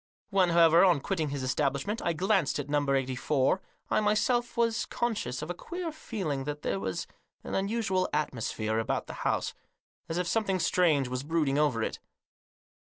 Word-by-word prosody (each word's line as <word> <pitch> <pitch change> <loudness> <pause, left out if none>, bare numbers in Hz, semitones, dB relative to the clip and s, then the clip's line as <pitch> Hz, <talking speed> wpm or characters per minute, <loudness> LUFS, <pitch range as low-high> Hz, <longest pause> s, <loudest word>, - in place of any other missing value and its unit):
When, 190 -2 +4
however, 170 0 +6
on 175 -6 +5
quitting 160 -1 -1
his 140 -1 -3
establishment 140 - -1
I 170 - +1
glanced 190 -1 +1
at 145 -1 -4
No. 145 -1 +1
84, 135 +5 +1 0.3
I - - +4
myself 235 +4 +1
was 230 -2 +1
conscious 220 - -2
of 160 - -4
a - - -2
queer 345 - -5
feeling 185 - -4
that 150 0 -5
there 95 - -1
was 95 -1 -3 0.4
an - - -6
unusual 195 -2 0
atmosphere 115 -6 -1
about 115 - -1
the - - -8
house, - - 0 0.6
as 165 - -2
if 180 - 0
some 225 +6 +1
thing 190 -1 +1
strange 160 -7 +2
was 125 0 -3
brooding 150 -2 +1
over 135 -7 +2
it. - - -3
160 Hz, 175 wpm, -29 LUFS, 140-195 Hz, 0.6 s, however